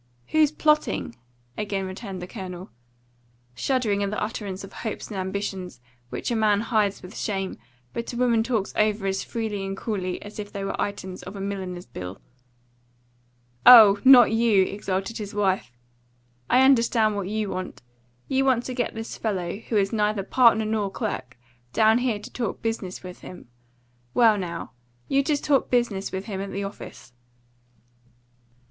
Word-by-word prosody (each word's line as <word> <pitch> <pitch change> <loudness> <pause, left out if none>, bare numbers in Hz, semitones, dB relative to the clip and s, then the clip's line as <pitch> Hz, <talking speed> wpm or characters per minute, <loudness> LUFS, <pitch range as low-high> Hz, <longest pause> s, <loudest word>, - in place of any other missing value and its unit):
"Who's 310 -2 +4
plotting?" 305 - +1 0.4
again 200 -2 -2
retorted 190 0 -7
the - - -4
Colonel, 185 -3 -8 0.8
shuddering 220 - 0
at 200 - 0
the 210 - -3
utterance 200 -3 -4
of 195 - -10
hopes 220 - -5
and 205 - -5
ambitions 190 -5 -4 0.3
which - - -4
a - - +1
man 210 -2 +3
hides 215 -4 0
with 180 +4 -10
shame, 195 - -3 0.3
but 235 - -4
a 240 - -6
woman 240 -2 +3
talks 225 -4 -1
over 210 -1 +1
as 195 0 -1
freely 220 -4 -3
and 195 0 -4
coolly 190 -5 -3
as 205 +1 -10
if 205 -1 -6
they 200 - -5
were 195 - -3
items 190 -2 -4
of 190 - -9
a - - -6
milliner's 190 -2 -4
bill. 90 -6 -8 1.4
"Oh, 215 -5 +10
not 255 -4 +8
you!" 225 -4 +4
exulted 195 +3 -3
his 205 -1 -6
wife. 190 -10 0 0.8
"I 255 +2 +5
understand 230 -4 +3
what 200 -2 -3
you 215 -1 -2
want. 185 -8 -6 0.4
You 270 0 +1
want 255 -3 +2
to 255 - -4
get 245 -1 -2
this 225 0 -6
fellow, 190 -4 -2
who 225 0 -2
is 195 0 +1
neither 210 -2 +1
partner 225 0 +4
nor 215 -2 0
clerk, 190 - -4 0.4
down 220 +1 +4
here 245 -4 0
to 205 - -11
talk 235 -5 -3
business 220 -6 -3
with 180 0 -9
him. 180 -9 -11 0.7
Well, 230 -3 +6
now, 175 -7 -5 0.4
you 275 0 +2
just 290 0 0
talk 280 -2 +2
business 235 -6 0
with 190 +1 -4
him 195 -3 -4
at 200 0 -5
the 200 +1 -3
office." 195 -10 -9
205 Hz, 165 wpm, -25 LUFS, 190-230 Hz, 1.4 s, Oh